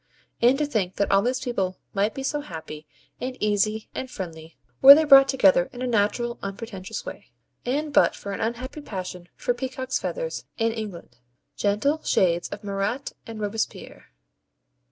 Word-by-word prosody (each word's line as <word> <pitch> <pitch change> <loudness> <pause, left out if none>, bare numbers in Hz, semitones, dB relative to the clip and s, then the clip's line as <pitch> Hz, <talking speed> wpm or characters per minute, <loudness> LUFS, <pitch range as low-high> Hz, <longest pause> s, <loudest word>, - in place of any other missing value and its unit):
And 245 +3 +5
to 300 - +1
think 205 -10 -1
that 200 - 0
all 195 0 +5
these 250 +4 -1
people 190 -7 -2 0.2
might 205 +2 0
be 270 - -5
so 295 +2 -1
happy, 160 - -9 0.3
and 255 0 -4
easy, 215 +1 0
and 260 - -5
friendly, 165 -6 -8 0.2
were 275 +1 +12
they 315 - +3
brought 275 -2 +8
together 190 -9 +4
in 245 0 -7
a - - 0
natural 235 +1 0
unpretentious 200 -1 -6
way, - - -8 0.4
and 290 +4 -1
but - - +4
for 200 - -7
an - - -5
unhappy 250 +6 -4
passion 180 -7 -7
for 245 - -1
peacocks' 260 +1 -3
feathers - - -4
in 225 -1 +1
England. 215 -6 -7 0.4
Gentle 245 +10 +1
shades 175 -2 +1
of 205 - -8
Marat 200 +6 -2
and 225 -1 -7
Robespierre! 215 +1 -4
220 Hz, 165 wpm, -25 LUFS, 195-260 Hz, 0.4 s, were